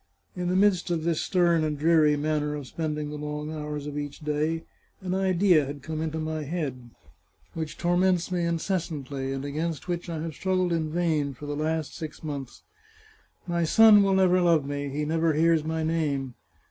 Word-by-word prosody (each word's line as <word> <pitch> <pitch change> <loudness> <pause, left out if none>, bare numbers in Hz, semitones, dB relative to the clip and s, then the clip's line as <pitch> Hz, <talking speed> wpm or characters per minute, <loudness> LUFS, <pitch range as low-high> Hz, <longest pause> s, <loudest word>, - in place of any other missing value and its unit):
In 180 -1 -2
the 180 - +1
midst 190 -2 +3
of 165 -2 -1
this 165 -1 0
stern 170 -3 +2
and 150 -1 -1
dreary 155 -1 +4
manner 150 0 -1
of 145 -2 -6
spending 150 +1 -3
the 150 - -5
long 150 +1 -4
hours 150 -1 -5
of 150 0 -4
each 145 +1 -6
day, 150 +2 -1 0.4
an 185 -1 -3
idea 185 -3 +3
had 140 -1 -7
come 155 +1 -4
into 160 0 -2
my 155 0 -3
head, 140 -6 -4 0.6
which 160 -1 -5
torments 180 +1 +1
me 175 -1 0
incessantly, 155 -6 -2
and 135 +1 -4
against 155 +4 -3
which 175 0 -3
I 165 -2 -3
have 165 -1 -4
struggled 185 +1 0
in 160 -2 -1
vain 155 -5 0
for 145 - -9
the 145 0 -3
last 155 0 -2
six 155 -1 -7
months. 140 -5 -6 0.8
My 170 -1 0
son 215 +4 +7
will 195 -1 +3
never 185 -1 +4
love 165 -5 +3
me; 145 0 -3
he 150 +2 -2
never 160 +1 +1
hears 165 0 +3
my 160 0 -2
name. 145 -5 -1
160 Hz, 185 wpm, -27 LUFS, 150-175 Hz, 0.8 s, son